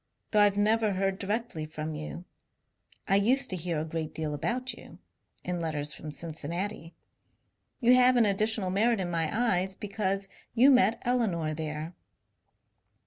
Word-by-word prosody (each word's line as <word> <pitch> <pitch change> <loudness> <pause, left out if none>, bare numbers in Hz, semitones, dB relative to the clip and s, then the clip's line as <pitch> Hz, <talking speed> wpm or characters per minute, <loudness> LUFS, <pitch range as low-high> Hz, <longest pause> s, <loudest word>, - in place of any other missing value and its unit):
Though 215 - +3
I 205 0 +7
Ve 200 0 -4
never 215 0 +2
heard 195 0 -1
directly 205 -6 -3
from 155 0 -5
you, 155 +3 -7 0.8
I 195 - +4
used 255 +5 +3
to - - 0
hear 170 -2 -2
a 155 - -2
great 160 -1 -5
deal 155 -2 -2
about 245 - -2
you, - - -13 0.5
in 180 -1 -3
letters 150 -2 -3
from 150 - -7
Cincinnati. 170 +4 -5 0.9
You 240 +1 +6
have 255 0 +6
an 235 -2 +5
additional 205 -1 +1
merit 220 +3 +2
in 175 -2 -2
my 165 -2 0
eyes 190 -5 +1
because 195 -1 -2 0.3
you 260 +4 +6
met 230 -4 +4
Elinor 195 -11 0
there. 155 +1 -5
195 Hz, 155 wpm, -29 LUFS, 160-220 Hz, 0.9 s, I